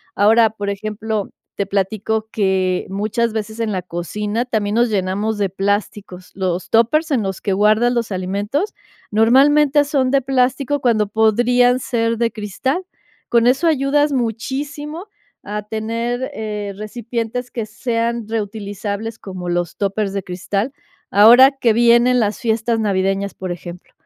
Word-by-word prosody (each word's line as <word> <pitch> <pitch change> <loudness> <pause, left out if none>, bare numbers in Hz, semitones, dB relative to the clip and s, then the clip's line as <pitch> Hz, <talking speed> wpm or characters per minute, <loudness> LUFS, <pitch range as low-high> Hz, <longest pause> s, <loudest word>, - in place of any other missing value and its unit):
Ahora, 220 +2 +5
por 205 -1 -4
ejemplo, 215 +1 -3 0.3
te 200 - -1
platico 215 +3 -1
que 190 -3 0
muchas 215 +4 -1
veces 220 0 -4
en 225 -2 -1
la 185 - -2
cocina 205 +6 -3
también 215 -4 -1
nos 240 +1 +3
llenamos 205 +2 -1
de 200 -2 0
plásticos. 195 -1 -3
Los 185 -2 -2
tópers 270 +9 +2
en 260 -5 +2
los 195 -2 -4
que 200 - -1
guardas 215 +5 +3
los 235 -4 -1
alimentos, 205 - -2 0.4
normalmente 280 +6 +4
son 275 -3 0
de 275 +1 +3
plástico 265 +2 0
cuando 225 -5 +2
podrían 240 +4 +3
ser 230 -2 -1
de 230 0 +1
cristal. 220 - -3 0.4
Con 235 -1 +3
eso 270 +7 +3
ayudas 290 -1 +2
muchísimo 285 - -3 0.4
a 210 +1 -4
tener, 230 +5 -3
eh, 210 -3 -4
recipientes 235 +3 -4
que 230 -3 -3
sean 230 +1 -2
reutilizables 210 0 -4
como 185 -2 -6
los 175 -1 -1
tópers 200 0 -1
de 195 -1 -3
cristal. 195 +7 -3 0.4
Ahora 240 +6 +8
que 250 -5 +1
vienen 240 +2 +4
las 210 -1 -1
fiestas 225 0 0
navideñas, 195 -1 0
por 185 -1 -6
ejemplo. 175 0 -9
220 Hz, 140 wpm, -19 LUFS, 200-245 Hz, 0.4 s, Ahora